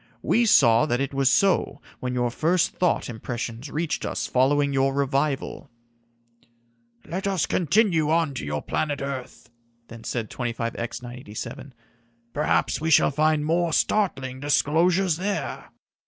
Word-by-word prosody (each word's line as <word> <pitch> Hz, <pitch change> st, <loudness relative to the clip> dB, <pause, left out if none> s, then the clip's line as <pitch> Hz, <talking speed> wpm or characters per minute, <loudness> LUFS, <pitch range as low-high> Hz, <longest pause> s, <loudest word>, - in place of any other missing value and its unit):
We 235 Hz, +1 st, +2 dB
saw 120 Hz, -, +5 dB
that 120 Hz, +1 st, 0 dB
it 140 Hz, 0 st, -2 dB
was 135 Hz, -1 st, +2 dB
so 185 Hz, 0 st, +2 dB, 0.2 s
when 125 Hz, 0 st, -3 dB
your 120 Hz, -1 st, 0 dB
first 165 Hz, +6 st, +1 dB
thought 180 Hz, -2 st, 0 dB
impressions 120 Hz, +2 st, -5 dB
reached 160 Hz, +2 st, -2 dB
us -, -, -2 dB
following 140 Hz, +2 st, +2 dB
your 135 Hz, 0 st, +1 dB
revival." 140 Hz, 0 st, -1 dB, 1.4 s
"Let 190 Hz, +4 st, -3 dB
us 190 Hz, -4 st, +1 dB
continue 175 Hz, -3 st, +2 dB
on 160 Hz, -2 st, +1 dB
to 130 Hz, -, -5 dB
your 75 Hz, 0 st, -3 dB
planet 145 Hz, -2 st, -2 dB
earth," 140 Hz, -4 st, -6 dB, 0.4 s
then 115 Hz, 0 st, -11 dB
said 115 Hz, -3 st, -4 dB
25X 120 Hz, 0 st, -4 dB
987. 120 Hz, +2 st, -8 dB, 0.6 s
"Perhaps 150 Hz, 0 st, 0 dB
we 160 Hz, -, 0 dB
shall 150 Hz, -, +5 dB
find 155 Hz, +1 st, +1 dB
more 170 Hz, +1 st, +1 dB
startling 135 Hz, -13 st, 0 dB
disclosures 165 Hz, +5 st, +2 dB
there." 200 Hz, +2 st, -3 dB
140 Hz, 135 wpm, -24 LUFS, 125-165 Hz, 1.4 s, saw